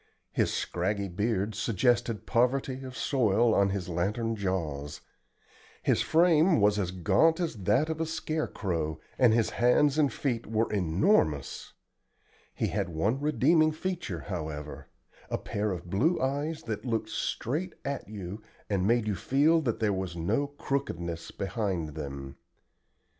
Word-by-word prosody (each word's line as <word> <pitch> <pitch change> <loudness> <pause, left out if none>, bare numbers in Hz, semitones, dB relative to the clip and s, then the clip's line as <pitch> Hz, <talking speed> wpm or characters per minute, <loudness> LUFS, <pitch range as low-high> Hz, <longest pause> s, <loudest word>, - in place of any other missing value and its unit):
His - - +1
scraggy 100 +3 -1
beard 105 +2 -1
suggested 115 +2 +1
poverty 130 +2 +1
of 130 -2 -8
soil 115 -2 +2
on 100 -1 +3
his 95 -2 -3
lantern 105 +7 -1
jaws. 80 -8 -3 0.8
His - - +2
frame 165 -1 +4
was 105 0 +3
as 95 -3 0
gaunt 155 - +3
as 170 -3 -1
that 105 +10 +3
of 160 0 -3
a 160 - 0
scare 160 -1 -2
crow, 80 -5 -3 0.2
and 125 -3 +6
his 115 0 +2
hands 135 +5 +3
and 145 -3 +3
feet 120 -5 -2
were 110 +1 0
enormous. 90 - +1 0.8
He - - 0
had - - -1
one 100 +11 0
redeeming 155 +2 +3
feature, 165 - -4
however 80 -5 -6 0.4
a - - 0
pair 105 +1 -2
of 90 -1 -5
blue 155 - +2
eyes 145 +4 -1
that 110 -3 -4
looked 115 -3 -1
straight 165 +9 -2
at 140 0 -3
you 100 0 -6 0.3
and 95 -1 +1
made 120 0 +3
you 105 - +1
feel 145 - +3
that 120 -7 -1
there 105 -3 +2
was 95 -2 -3
no 100 +12 0
"crookedness" 85 - -3
behind 95 -5 -2
them. 70 -3 -7
110 Hz, 145 wpm, -29 LUFS, 90-140 Hz, 0.8 s, and